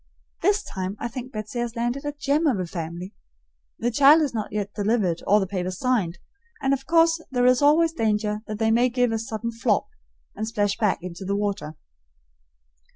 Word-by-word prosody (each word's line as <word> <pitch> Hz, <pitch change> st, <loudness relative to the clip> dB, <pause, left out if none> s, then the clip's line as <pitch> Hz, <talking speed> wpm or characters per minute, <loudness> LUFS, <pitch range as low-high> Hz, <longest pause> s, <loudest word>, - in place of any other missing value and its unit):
This 410 Hz, +4 st, +2 dB
time 190 Hz, +1 st, -5 dB
I -, -, -2 dB
think 250 Hz, +2 st, -7 dB
Betsy 215 Hz, +1 st, -5 dB
has 240 Hz, 0 st, -3 dB
landed 240 Hz, +4 st, -2 dB
a 290 Hz, -, -1 dB
gem 290 Hz, +2 st, 0 dB
of 245 Hz, -9 st, +1 dB
a 185 Hz, -, -1 dB
family. 170 Hz, +2 st, -6 dB, 0.6 s
The 240 Hz, +1 st, -1 dB
child 285 Hz, +6 st, +6 dB
is 280 Hz, -, -2 dB
not 215 Hz, -3 st, -3 dB
yet 205 Hz, -1 st, -3 dB
delivered 205 Hz, -5 st, 0 dB
or 205 Hz, +1 st, +5 dB
the 195 Hz, -, 0 dB
papers 185 Hz, -1 st, -3 dB
signed, 215 Hz, -10 st, 0 dB, 0.4 s
and 275 Hz, -1 st, +1 dB
of 270 Hz, 0 st, -3 dB
course 330 Hz, 0 st, +4 dB
there 245 Hz, -2 st, +1 dB
is 255 Hz, +1 st, +4 dB
always 320 Hz, +3 st, +4 dB
danger 210 Hz, -5 st, 0 dB
that 215 Hz, -1 st, -4 dB
they 220 Hz, 0 st, +2 dB
may 240 Hz, +3 st, +4 dB
give 245 Hz, -1 st, +1 dB
a 225 Hz, -, -1 dB
sudden 230 Hz, 0 st, -4 dB
flop, 230 Hz, -, +1 dB, 0.5 s
and 215 Hz, -, -3 dB
splash 205 Hz, -2 st, 0 dB
back 195 Hz, -6 st, 0 dB
into 180 Hz, +1 st, -7 dB
the 200 Hz, +1 st, -1 dB
water. 200 Hz, -6 st, -2 dB
225 Hz, 195 wpm, -24 LUFS, 205-260 Hz, 0.6 s, child